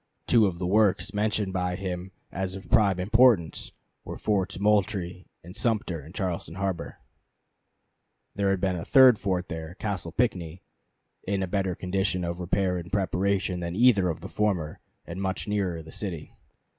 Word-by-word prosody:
Two 110 Hz, -4 st, +5 dB
of 90 Hz, -3 st, -3 dB
the 90 Hz, -, -3 dB
works 105 Hz, +2 st, +2 dB
mentioned 105 Hz, -2 st, 0 dB
by 90 Hz, -1 st, -1 dB
him 95 Hz, 0 st, -5 dB, 0.2 s
as 95 Hz, 0 st, -3 dB
of 95 Hz, -, -10 dB
prime 100 Hz, -4 st, +4 dB
importance 110 Hz, -3 st, +3 dB, 0.3 s
were -, -, -7 dB
Forts 95 Hz, -3 st, -1 dB
Moultrie 100 Hz, -3 st, 0 dB, 0.2 s
and 90 Hz, +3 st, -11 dB
Sumter 105 Hz, -, -1 dB
in 80 Hz, -, -12 dB
Charleston 90 Hz, -4 st, -3 dB
harbor. 95 Hz, -3 st, -3 dB, 1.4 s
There 100 Hz, -1 st, 0 dB
was 95 Hz, 0 st, +2 dB
still 90 Hz, -1 st, -1 dB
a -, -, -5 dB
third 130 Hz, -4 st, +7 dB
fort 95 Hz, -2 st, -1 dB
there, 80 Hz, 0 st, -6 dB
Castle 95 Hz, -6 st, -3 dB
Pinckney, 90 Hz, -7 st, -1 dB, 0.6 s
in 100 Hz, 0 st, 0 dB
a -, -, -2 dB
better 95 Hz, -1 st, -1 dB
condition 90 Hz, 0 st, -1 dB
of 85 Hz, 0 st, -3 dB
repair 90 Hz, 0 st, 0 dB
and 85 Hz, 0 st, -9 dB
preparation 95 Hz, -1 st, 0 dB
than 85 Hz, 0 st, -4 dB
either 105 Hz, -5 st, +4 dB
of 80 Hz, -1 st, -4 dB
the 95 Hz, -, -6 dB
former, 95 Hz, -8 st, -1 dB, 0.3 s
and 85 Hz, +3 st, -6 dB
much 95 Hz, +1 st, -2 dB
nearer 95 Hz, -6 st, -1 dB
the 80 Hz, -, -12 dB
city. 85 Hz, -7 st, -6 dB
95 Hz, 165 wpm, -27 LUFS, 90-100 Hz, 1.4 s, third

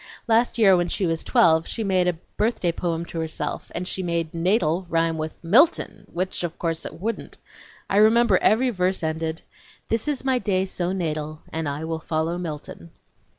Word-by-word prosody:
Last 230 Hz, +2 st, +3 dB
year 200 Hz, -5 st, +6 dB
when 175 Hz, -1 st, +1 dB
she 195 Hz, -, -1 dB
was 165 Hz, -1 st, -1 dB
twelve 160 Hz, -1 st, +4 dB
she 225 Hz, -, -3 dB
wrote 185 Hz, -3 st, +2 dB
a 175 Hz, -2 st, 0 dB, 0.2 s
birthday 210 Hz, -5 st, +1 dB
poem 170 Hz, -1 st, -2 dB
to 170 Hz, -, -6 dB
herself, 160 Hz, -1 st, -3 dB
and 180 Hz, +1 st, -3 dB
she 190 Hz, -, -2 dB
made 170 Hz, -2 st, -2 dB
natal' 175 Hz, 0 st, +1 dB
rhyme 165 Hz, -1 st, +1 dB
with 155 Hz, 0 st, -4 dB
Milton,.' 265 Hz, -, +3 dB
which, 185 Hz, +1 st, -3 dB
of 170 Hz, -1 st, -4 dB
course, 165 Hz, -1 st, -2 dB
it -, -, -10 dB
wouldn't. 220 Hz, +3 st, -4 dB, 0.5 s
I 195 Hz, -, 0 dB
remember 230 Hz, +3 st, +5 dB
every 250 Hz, +4 st, +3 dB
verse 185 Hz, -3 st, 0 dB
ended: 160 Hz, +1 st, -2 dB, 0.5 s
'This 225 Hz, +3 st, 0 dB
is 285 Hz, -3 st, -2 dB
my 260 Hz, -2 st, +2 dB
day 190 Hz, -4 st, 0 dB
so 180 Hz, -1 st, -2 dB
natal 155 Hz, -4 st, -3 dB
And 160 Hz, -2 st, -2 dB
I 145 Hz, +2 st, -4 dB
will 160 Hz, 0 st, -3 dB
follow 160 Hz, +2 st, -2 dB
Milton.' 150 Hz, -, -7 dB
175 Hz, 185 wpm, -24 LUFS, 160-200 Hz, 0.5 s, year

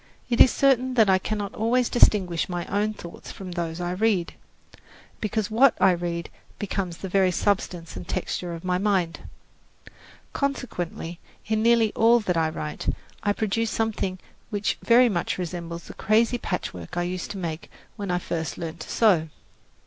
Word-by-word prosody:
It 235 Hz, -, +5 dB
is -, -, +9 dB
certain 260 Hz, -1 st, +2 dB
that 220 Hz, -5 st, +5 dB
I 190 Hz, -, +4 dB
cannot 205 Hz, 0 st, -3 dB
always 235 Hz, +3 st, +2 dB
distinguish 185 Hz, -8 st, +3 dB
my 175 Hz, -1 st, -3 dB
own 210 Hz, +2 st, -1 dB
thoughts 170 Hz, -3 st, -10 dB
from 190 Hz, -2 st, -8 dB
those 170 Hz, -1 st, -3 dB
I 175 Hz, 0 st, -2 dB
read, 190 Hz, -2 st, +1 dB, 0.9 s
because 215 Hz, 0 st, -2 dB
what 245 Hz, +3 st, +5 dB
I 190 Hz, 0 st, +6 dB
read 170 Hz, -1 st, -3 dB, 0.3 s
becomes 190 Hz, -4 st, -3 dB
the 190 Hz, -, -6 dB
very 190 Hz, 0 st, +3 dB
substance 180 Hz, -, -1 dB
and 90 Hz, -1 st, -7 dB
texture 175 Hz, -2 st, -3 dB
of 165 Hz, -, -9 dB
my 180 Hz, 0 st, 0 dB
mind. 190 Hz, -5 st, +1 dB, 1.1 s
Consequently, 180 Hz, -, -3 dB, 0.3 s
in 215 Hz, 0 st, 0 dB
nearly 230 Hz, -1 st, +4 dB
all 235 Hz, +2 st, +5 dB
that 185 Hz, -5 st, -1 dB
I 160 Hz, -1 st, +2 dB
write, 150 Hz, -1 st, -4 dB, 0.3 s
I 205 Hz, -, +1 dB
produce 220 Hz, +2 st, 0 dB
something 215 Hz, -5 st, -1 dB, 0.3 s
which 205 Hz, -2 st, -1 dB
very 245 Hz, +2 st, +6 dB
much 180 Hz, -7 st, -1 dB
resembles 170 Hz, -1 st, -5 dB
the -, -, -10 dB
crazy 230 Hz, +3 st, +2 dB
patchwork 125 Hz, -, -4 dB
I 175 Hz, -, +1 dB
used 180 Hz, 0 st, -4 dB
to 200 Hz, -, -5 dB
make 165 Hz, -3 st, -5 dB, 0.3 s
when 200 Hz, -3 st, -5 dB
I 180 Hz, -, +1 dB
first 165 Hz, -2 st, -3 dB
learned 165 Hz, 0 st, -6 dB
to -, -, -8 dB
sew. 180 Hz, -9 st, +3 dB
190 Hz, 165 wpm, -25 LUFS, 175-220 Hz, 1.1 s, is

